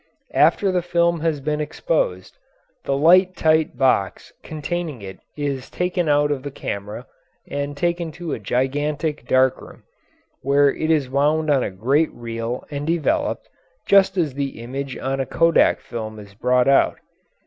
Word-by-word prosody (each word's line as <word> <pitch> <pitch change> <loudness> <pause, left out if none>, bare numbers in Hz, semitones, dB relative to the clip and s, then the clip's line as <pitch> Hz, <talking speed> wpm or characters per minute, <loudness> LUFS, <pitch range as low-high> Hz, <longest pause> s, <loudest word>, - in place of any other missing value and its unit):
After 195 -2 +3
the 180 -1 +1
film 170 -1 +1
has 155 -3 -1
been 150 +2 -1
exposed, 145 - -2 0.5
the 135 - 0
light 180 +5 +5
tight 160 -1 +2
box 130 -8 0
containing 155 -4 -5
it 95 -1 -9 0.2
is 140 -3 -3
taken 180 -2 -1
out 145 0 +3
of 140 -3 -2
the 145 - -5
camera 105 -5 -6 0.4
and 145 0 -4
taken 170 +1 -1
to 170 -2 -5
a - - -4
gigantic 145 - -2
dark 130 0 +3
room, - - -14 0.6
where 140 +1 +3
it 160 - -3
is 150 -5 +2
wound 150 +3 +1
on 135 -2 +3
a - - -2
great 130 +12 +1
reel 115 +1 -5
and 145 +1 -4
developed, 290 - 0 0.4
just 195 -1 +4
as 160 -6 0
the 140 -2 -4
image 135 +2 -5
on 135 +1 -3
a 135 - 0
kodak 165 0 +3
film 110 -2 -7
is 100 -1 -12
brought 125 +4 +2
out. 140 0 +4
145 Hz, 160 wpm, -21 LUFS, 130-165 Hz, 0.6 s, light